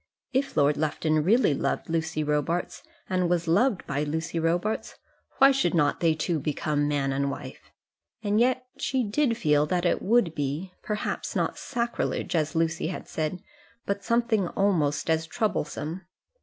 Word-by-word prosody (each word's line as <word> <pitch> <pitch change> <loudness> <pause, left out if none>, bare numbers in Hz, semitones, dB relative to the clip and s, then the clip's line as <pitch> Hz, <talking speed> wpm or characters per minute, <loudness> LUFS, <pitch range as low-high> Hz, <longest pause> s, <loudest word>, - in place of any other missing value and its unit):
If 270 +1 0
Lord 145 +1 +4
Lufton 155 0 +1
really 210 - +4
loved - - -1
Lucy 160 -1 -1
Robarts, 150 +4 -1 0.3
and 180 -2 +1
was 175 -1 0
loved 200 +5 +2
by 145 0 -2
Lucy 160 +3 -2
Robarts, 175 +6 -1 0.4
why 270 0 +7
should 270 -8 +1
not 145 -3 +2
they 165 -2 +3
two 155 +1 -1
become 145 +1 -1
man 140 -2 0
and 140 +1 0
wife? - - -8 0.5
And 205 +1 +2
yet 255 +1 +2
she 255 0 0
did 230 +2 +1
feel 150 -6 +3
that 180 +2 0
it 175 - +2
would 215 -5 +3
be 150 +6 -3
perhaps 210 -1 -3
not - - 0
sacrilege, 235 -6 -2
as 155 +1 0
Lucy 160 -1 0
had 175 - -5
said, 160 +3 -3 0.4
but 200 0 -2
something 230 -4 +1
almost 170 -8 +1
as 160 0 +1
troublesome. 175 -3 -2
165 Hz, 155 wpm, -27 LUFS, 150-205 Hz, 0.5 s, why